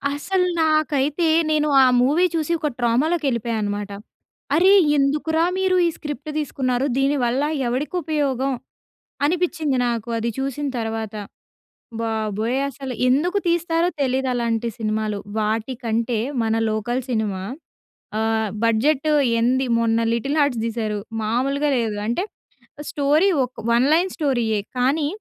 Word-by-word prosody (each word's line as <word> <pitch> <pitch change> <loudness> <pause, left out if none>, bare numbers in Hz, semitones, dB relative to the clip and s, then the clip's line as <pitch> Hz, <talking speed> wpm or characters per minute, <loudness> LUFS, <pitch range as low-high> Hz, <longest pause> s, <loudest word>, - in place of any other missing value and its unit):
అసలు 365 +5 0 0.2
నాకైతే 310 0 +1 0.3
నేను 305 -1 +2 0.2
ఆ - - +6 0.2
మూవీ 295 +8 +3
చూసి 320 0 -1
ఒక 300 - -1
ట్రామాలోకి 285 +8 +1
వెళ్ళిపోయానన్నమాట. 215 -4 -2 0.6
"అరే! 370 +4 +6 0.2
ఎందుకురా 300 +4 +1
మీరు 380 -1 +2
ఈ - - +2
స్క్రిప్ట్ 295 0 -6
తీసుకున్నారు! 260 -3 -1
దీనివల్ల 270 -1 +1 0.2
ఎవడికి 260 +8 -2
ఉపయోగం?" 275 -4 0 0.7
అనిపించింది 320 -4 0
నాకు 235 0 -3
అది 230 +1 -1
చూసిన 275 +2 -2
తర్వాత. 225 -1 -3 0.9
బాబోయ్! 220 +2 -1
అసలు 270 -1 -6
ఎందుకు 335 +10 +2
తీస్తారో 340 0 +1
తెలీదలాంటి 245 -3 0
సినిమాలు. 215 -1 -1 0.2
వాటికంటే 230 +1 -1 0.3
మన 220 0 +1 0.2
లోకల్ 240 +4 -1
సినిమా 210 -5 -1 0.8
ఆహ్, 220 -1 0
బడ్జెట్ 260 +7 +2 0.3
ఎంది 260 +3 +2
మొన్న 230 0 +2
'లిటిల్ 275 +6 -1
హార్ట్స్' 270 -6 +1
తీసారు 220 -2 -2 0.2
మామూలుగా 275 +7 0
లేదు. 225 -3 -1
అంటే 240 +11 0 0.7
స్టోరీ 295 +6 +2 0.2
ఒక 250 - -8 0.2
వన్ 240 +3 +4
లైన్ 350 +4 +3
స్టోరీయే. 240 -8 0 0.2
కానీ 280 +5 +2
260 Hz, 115 wpm, -22 LUFS, 225-300 Hz, 0.9 s, ఆ